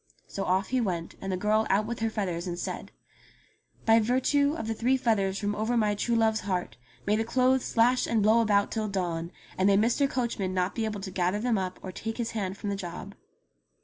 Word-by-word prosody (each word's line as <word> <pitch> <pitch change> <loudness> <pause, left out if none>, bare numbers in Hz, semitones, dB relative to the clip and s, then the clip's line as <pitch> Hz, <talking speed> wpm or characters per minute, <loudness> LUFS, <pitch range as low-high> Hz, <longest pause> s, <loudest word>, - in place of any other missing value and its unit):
So 195 - -4
off 190 +1 +1
he 255 -1 +1
went, 175 -6 -2
and 195 - -3
the 185 - -1
girl 215 +3 +1
out 205 +2 +2
with 235 +1 -4
her 225 0 0
feathers 185 -5 -3
and 175 -1 -3
said: - - -5 0.5
" - - -34
By 225 0 +6
virtue 260 +6 +2
of 225 - -4
the 225 - -1
three 250 +4 +1
feathers 200 -6 +1
from 205 0 -1
over 220 +3 0
my 210 -2 +2
true 235 +3 0
love's 220 -1 +2
heart 185 -4 -3 0.3
may 210 - +2
the 220 - +1
clothes 255 +2 +2
slash 245 +2 +3
and 225 -3 +1
blow 220 +2 +5
about 205 -2 +2
till 220 -1 -1
dawn, 175 -4 -2 0.3
and 190 - +4
may 200 -1 +5
Mr. 240 +6 +2
Coachman 230 -8 -2
not 180 +1 0
be 225 - -1
able 210 -2 -4
to 190 -1 -6
gather 185 +1 0
them 230 -2 +1
up 185 -1 -4
or 185 - -5
take 225 +4 -5
his 235 -2 -2
hand 195 -4 -3
from 205 - -3
the - - -1
job." 190 +1 -7
210 Hz, 230 wpm, -28 LUFS, 190-230 Hz, 0.5 s, By